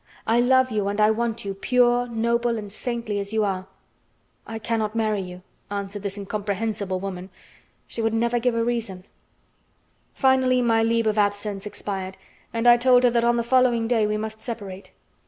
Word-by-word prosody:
I 230 Hz, +2 st, +3 dB
love 260 Hz, +1 st, +4 dB
you 210 Hz, -2 st, 0 dB
and 200 Hz, +1 st, -2 dB
I 215 Hz, +1 st, +5 dB
want 230 Hz, 0 st, -2 dB
you, 195 Hz, -, -3 dB
pure, 245 Hz, +3 st, +2 dB
noble, 235 Hz, 0 st, 0 dB
and 205 Hz, -2 st, -7 dB
saintly 235 Hz, -3 st, -3 dB
as 200 Hz, +1 st, -5 dB
you 220 Hz, -1 st, +2 dB
are." 190 Hz, -2 st, -2 dB, 0.8 s
"I 225 Hz, -, -5 dB
cannot 220 Hz, -1 st, -2 dB
marry 215 Hz, -3 st, 0 dB
you," 180 Hz, -1 st, -9 dB, 0.3 s
answered 200 Hz, 0 st, -4 dB
this 200 Hz, 0 st, -4 dB
incomprehensible 200 Hz, -1 st, -3 dB
woman. 185 Hz, -1 st, -6 dB, 0.6 s
She 230 Hz, -, -5 dB
would 225 Hz, 0 st, +1 dB
never 235 Hz, +1 st, +1 dB
give 240 Hz, 0 st, 0 dB
a 230 Hz, -, +1 dB
reason. 230 Hz, -6 st, -3 dB, 1.1 s
Finally 260 Hz, -1 st, +3 dB
my 225 Hz, -1 st, +3 dB
leave 230 Hz, 0 st, +1 dB
of 215 Hz, 0 st, +1 dB
absence 205 Hz, 0 st, -1 dB
expired, 190 Hz, -2 st, -5 dB, 0.3 s
and 230 Hz, +1 st, 0 dB
I 240 Hz, 0 st, +8 dB
told 250 Hz, 0 st, +4 dB
her 245 Hz, -, +5 dB
that 235 Hz, 0 st, +2 dB
on 240 Hz, 0 st, +3 dB
the 235 Hz, -, 0 dB
following 240 Hz, -2 st, +3 dB
day 225 Hz, -3 st, +2 dB
we 210 Hz, 0 st, -1 dB
must 220 Hz, 0 st, -6 dB
separate. 200 Hz, -5 st, -7 dB
225 Hz, 180 wpm, -24 LUFS, 205-235 Hz, 1.1 s, I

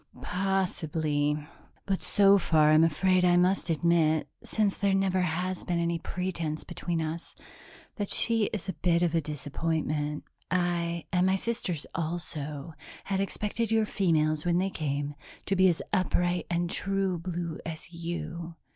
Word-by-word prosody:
"Possibly, 160 Hz, -6 st, 0 dB, 0.5 s
but 195 Hz, -1 st, -1 dB
so 200 Hz, -1 st, +5 dB
far 155 Hz, -3 st, +4 dB
I'm 155 Hz, +1 st, +6 dB
afraid 185 Hz, +3 st, +3 dB
I 175 Hz, -1 st, +5 dB
must 180 Hz, 0 st, +2 dB
admit 160 Hz, -1 st, +2 dB, 0.2 s
since 210 Hz, -3 st, +1 dB
there 200 Hz, -1 st, +2 dB
never 190 Hz, -1 st, +2 dB
has 180 Hz, +2 st, -1 dB
been 175 Hz, -2 st, -1 dB
any 170 Hz, 0 st, 0 dB
pretense 170 Hz, -3 st, -3 dB
between 175 Hz, -1 st, -3 dB
us 160 Hz, +2 st, -5 dB, 0.6 s
that 205 Hz, -2 st, -2 dB
she 225 Hz, -2 st, +2 dB
is 205 Hz, -2 st, -4 dB
a 190 Hz, -, -2 dB
bit 170 Hz, -1 st, +2 dB
of 175 Hz, -, +1 dB
a 165 Hz, -, +2 dB
disappointment. 150 Hz, 0 st, -2 dB, 0.3 s
I 170 Hz, -2 st, 0 dB
and 180 Hz, +1 st, +3 dB
my 190 Hz, -, +3 dB
sisters 190 Hz, -7 st, -2 dB
also 155 Hz, -3 st, -4 dB, 0.3 s
had 195 Hz, -1 st, -1 dB
expected 210 Hz, +3 st, -1 dB
your 220 Hz, -1 st, +3 dB
females, 155 Hz, -7 st, +1 dB
when 175 Hz, -1 st, +2 dB
they 190 Hz, +2 st, +1 dB
came, 145 Hz, -3 st, -2 dB, 0.3 s
to 195 Hz, -, +1 dB
be 190 Hz, 0 st, +5 dB
as 170 Hz, -, -1 dB
upright 175 Hz, -1 st, +1 dB
and 175 Hz, 0 st, 0 dB
true 195 Hz, -1 st, -1 dB
blue 170 Hz, -2 st, -4 dB
as 165 Hz, +1 st, -7 dB
you. 170 Hz, 0 st, -5 dB
175 Hz, 150 wpm, -29 LUFS, 160-190 Hz, 0.6 s, I'm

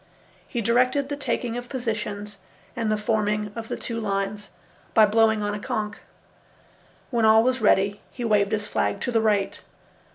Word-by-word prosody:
He 240 Hz, -, -3 dB
directed 255 Hz, +5 st, +2 dB
the 290 Hz, -, -2 dB
taking 245 Hz, -4 st, -2 dB
of 245 Hz, 0 st, -7 dB
positions 210 Hz, -5 st, -4 dB, 0.4 s
and 225 Hz, -3 st, -1 dB
the 215 Hz, -, +2 dB
forming 210 Hz, -1 st, 0 dB
of 230 Hz, -1 st, -6 dB
the -, -, -4 dB
two 230 Hz, -1 st, -4 dB
lines 200 Hz, 0 st, -2 dB, 0.5 s
by 220 Hz, -2 st, +8 dB
blowing 220 Hz, 0 st, +3 dB
on 205 Hz, 0 st, -1 dB
a 210 Hz, -, -4 dB
conch. 210 Hz, 0 st, -3 dB, 1.1 s
When 235 Hz, -2 st, +1 dB
all 220 Hz, 0 st, +6 dB
was 255 Hz, 0 st, +1 dB
ready, 200 Hz, -1 st, +3 dB
he 245 Hz, -, -5 dB
waved 205 Hz, -2 st, +2 dB
his 210 Hz, -1 st, -1 dB
flag 100 Hz, -, -1 dB
to -, -, -1 dB
the 225 Hz, -2 st, +2 dB
right. 205 Hz, -3 st, +1 dB
215 Hz, 170 wpm, -25 LUFS, 205-235 Hz, 1.1 s, by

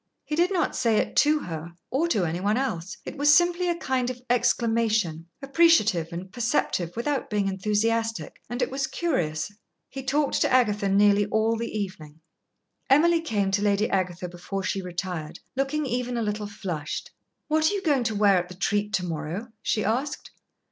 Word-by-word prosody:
He 300 Hz, -, -2 dB
did 350 Hz, +4 st, +2 dB
not 355 Hz, -4 st, 0 dB
say 230 Hz, -4 st, +2 dB
it -, -, -1 dB
to 300 Hz, +1 st, +5 dB
her 165 Hz, 0 st, -6 dB, 0.2 s
or 285 Hz, +7 st, +1 dB
to 210 Hz, -, +1 dB
any 165 Hz, +1 st, -2 dB
one 205 Hz, +4 st, +1 dB
else. 190 Hz, -10 st, -3 dB
It -, -, -7 dB
was 290 Hz, 0 st, +5 dB
simply 350 Hz, +2 st, +4 dB
a 345 Hz, -, +1 dB
kind 260 Hz, -6 st, -1 dB
of 250 Hz, -1 st, -5 dB
exclamation, 225 Hz, -8 st, +1 dB, 0.2 s
appreciative 275 Hz, -, +3 dB
and 180 Hz, +2 st, -7 dB
perceptive 225 Hz, -7 st, 0 dB
without 275 Hz, +3 st, -2 dB
being 205 Hz, -3 st, 0 dB
enthusiastic, 220 Hz, +3 st, -1 dB
and 240 Hz, +2 st, -1 dB
it -, -, -2 dB
was 270 Hz, 0 st, -1 dB
curious. 175 Hz, -, -1 dB, 0.4 s
He 270 Hz, -, -6 dB
talked 280 Hz, +2 st, 0 dB
to -, -, +2 dB
Agatha 210 Hz, -6 st, +3 dB
nearly 205 Hz, +1 st, +4 dB
all 220 Hz, +2 st, +1 dB
the 230 Hz, +1 st, -3 dB
evening. 165 Hz, -7 st, -6 dB, 0.7 s
Emily 330 Hz, +5 st, +5 dB
came 205 Hz, -11 st, 0 dB
to 200 Hz, +1 st, +1 dB
Lady 205 Hz, +1 st, +2 dB
Agatha 180 Hz, -2 st, -1 dB
before 180 Hz, +3 st, -5 dB
she 195 Hz, -, -1 dB
retired, 180 Hz, -3 st, -5 dB, 0.2 s
looking 275 Hz, +3 st, 0 dB
even 250 Hz, -1 st, -2 dB
a 230 Hz, -, 0 dB
little 210 Hz, 0 st, -2 dB
flushed. 180 Hz, -8 st, -5 dB, 0.4 s
"What 310 Hz, +1 st, +3 dB
are -, -, -2 dB
you 395 Hz, -, -3 dB
going 285 Hz, -6 st, +2 dB
to 220 Hz, -, -1 dB
wear 200 Hz, -2 st, +4 dB
at 180 Hz, 0 st, -5 dB
the 185 Hz, -, -9 dB
treat 205 Hz, +2 st, -1 dB
to 180 Hz, -, 0 dB
morrow?" 165 Hz, +7 st, -4 dB
she 215 Hz, -, 0 dB
asked. 255 Hz, +7 st, -2 dB
215 Hz, 185 wpm, -26 LUFS, 190-270 Hz, 0.7 s, to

